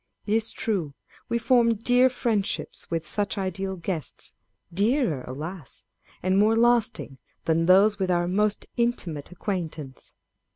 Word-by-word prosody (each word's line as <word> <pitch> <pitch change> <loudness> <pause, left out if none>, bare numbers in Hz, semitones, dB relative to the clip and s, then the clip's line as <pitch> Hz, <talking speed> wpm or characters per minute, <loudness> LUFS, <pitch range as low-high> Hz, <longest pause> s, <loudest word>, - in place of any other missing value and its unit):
It 210 - 0
is 225 0 +2
true, 175 -11 -2 0.3
we 235 - +1
form 235 0 +3
dear 245 +4 +4
friendships 225 -5 -2
with 165 -1 -2
such 205 +4 -2
ideal 190 0 -2
guests 170 -4 -4 0.4
â€" - - -15
dearer, 205 - +2
alas! 155 +3 -7 0.4
and 185 +2 +3
more 215 +2 +4
lasting, 230 - +2 0.3
than 165 +1 +2
those 200 +3 +5
with 190 -1 0
our 175 -1 +2
most 210 +3 +1
intimate 185 - -1
acquaintance. 165 - -5
195 Hz, 135 wpm, -26 LUFS, 170-225 Hz, 0.4 s, those